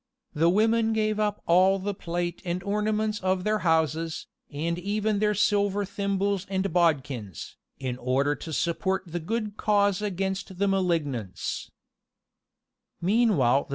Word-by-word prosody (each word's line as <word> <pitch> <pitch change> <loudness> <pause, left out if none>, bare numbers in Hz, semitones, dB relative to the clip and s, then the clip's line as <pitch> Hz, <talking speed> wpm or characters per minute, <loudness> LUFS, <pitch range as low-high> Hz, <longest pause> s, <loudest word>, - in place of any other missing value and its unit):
The 165 +3 +3
women 225 +3 +3
gave 215 -1 0
up 210 -1 -1
all 185 +3 +5
the 200 +2 -3
plate 175 -2 -3
and 180 0 -3
ornaments 210 +1 0
of 185 0 0
their 215 +1 +1
houses, 160 -1 0 0.2
and 165 +4 -2
even 205 +2 0
their 210 0 +2
silver 205 -1 +2
thimbles 200 0 -1
and 190 0 -1
bodkins, 140 - 0 0.2
"in 130 -2 -4
order 135 +4 +1
to 160 - -7
support 185 +4 0
the 175 0 -4
good 215 +4 -3
cause 205 -2 +2
against 190 -1 -3
the 200 +2 +1
malignants." 160 - -1
190 Hz, 125 wpm, -27 LUFS, 165-205 Hz, 0.2 s, all